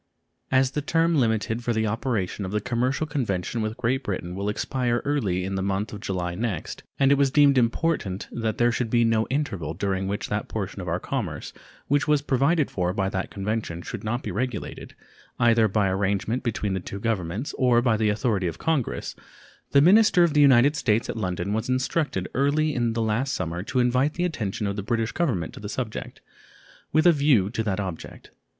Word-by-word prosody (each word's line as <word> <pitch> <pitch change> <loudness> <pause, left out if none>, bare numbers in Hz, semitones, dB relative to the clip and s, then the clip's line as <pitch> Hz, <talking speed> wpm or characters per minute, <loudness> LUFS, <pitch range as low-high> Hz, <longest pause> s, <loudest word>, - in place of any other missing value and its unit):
As 130 0 +3
the 150 - -2
term 165 +3 +2
limited 110 0 0
for 120 - 0
the 110 0 0
operation 105 -3 -2
of 95 - -3
the 105 - 0
commercial 125 +7 -1
convention 120 - -2
with 110 +1 -3
Great 125 +2 0
Britain 90 -3 -4
will 100 +2 -2
expire 120 +3 -1
early 105 -11 0
in 95 - -3
the 95 - -1
month 100 +3 -2
of 105 - -6
July 90 -4 -3
next, 105 +1 -4 0.2
and 135 0 +4
it 140 - +4
was 140 -1 +4
deemed 140 0 +5
important 120 - 0
that 115 -2 -2
there 120 0 +3
should 120 0 -2
be 120 +1 +3
no 115 -1 +2
interval 105 - -2
during 95 0 -1
which 100 +1 -3
that - - -2
portion - - -4
of - - -7
our - - -1
commerce - - -4 0.3
which 145 +1 +1
was 150 -1 +3
provided 145 +3 +2
for 90 -1 -1
by 95 -1 0
that 95 -1 -3
convention 100 -4 -3
should - - -6
not 120 +4 -2
be 105 - -4
regulated, 120 +3 -4 0.4
either 115 -2 +4
by 105 0 +1
arrangement 100 +5 0
between 105 -5 -2
the 95 - -1
two 100 +2 -7
Governments 105 - -2
or 125 -3 +4
by 120 -2 +2
the 110 0 +1
authority 105 -3 0
of 85 -1 -4
Congress, 155 -7 -1 0.5
the 140 - +5
minister 185 +2 +6
of 170 -3 +2
the 150 - +4
United 140 +1 +6
States 115 -5 +1
at - - -8
London 95 -2 -2
was 110 +3 -2
instructed 130 - 0
early 145 +4 +1
in 120 -3 0
the 115 0 0
last 115 +5 0
summer 85 -1 -3
to 130 +7 -4
invite 125 +4 +2
the 175 - 0
attention 110 - -3
of 100 0 -2
the 100 - -3
British 115 +2 -1
Government 120 - -1
to - - -10
the 105 - -6
subject, 115 -2 -5 0.7
with 155 +2 +3
a 175 - +8
view 140 - +3
to 115 - -2
that 105 -3 -1
object. 95 -5 -7
115 Hz, 205 wpm, -25 LUFS, 100-135 Hz, 0.7 s, a